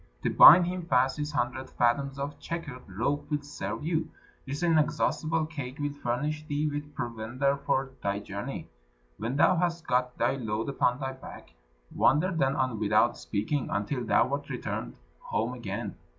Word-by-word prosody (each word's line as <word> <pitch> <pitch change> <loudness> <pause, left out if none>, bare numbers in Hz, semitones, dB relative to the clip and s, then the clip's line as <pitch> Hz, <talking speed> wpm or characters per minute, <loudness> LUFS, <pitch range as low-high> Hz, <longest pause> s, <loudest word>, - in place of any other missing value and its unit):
To - - +1
bind 175 +4 +10
him 180 -1 -4
fast 130 0 +2
this 150 0 -3
hundred 130 -1 -2
fathoms 135 +3 +1
of 140 +1 -5
checkered 145 -7 -6
rope 125 +10 -2
will 150 -1 -1
serve 145 +1 -5
you. 160 -1 0 0.4
This 140 +5 -4
inexhaustible 160 0 +1
cake 140 -4 -6
will 145 0 -2
furnish 145 +3 -2
thee 145 +1 0
with 145 0 -5
provender 120 +4 -1
for 140 -1 -1
thy 100 0 -1
journey. 100 - -6 0.5
When 115 +5 -2
thou 170 +5 +4
hast 170 -1 -1
got 125 0 0
thy 120 +3 +1
load 110 0 -2
upon 125 -2 +1
thy 135 -1 -3
back, 130 0 -12 0.4
wander 160 +7 +3
then 140 -5 +1
on 130 -5 -1
without 110 +3 +3
speaking, 115 +6 -2
until 105 +6 -2
thou 120 +1 +3
art 145 +1 -3
returned - - -4 0.2
home - - -2
again. - - -5
140 Hz, 165 wpm, -28 LUFS, 125-150 Hz, 0.5 s, bind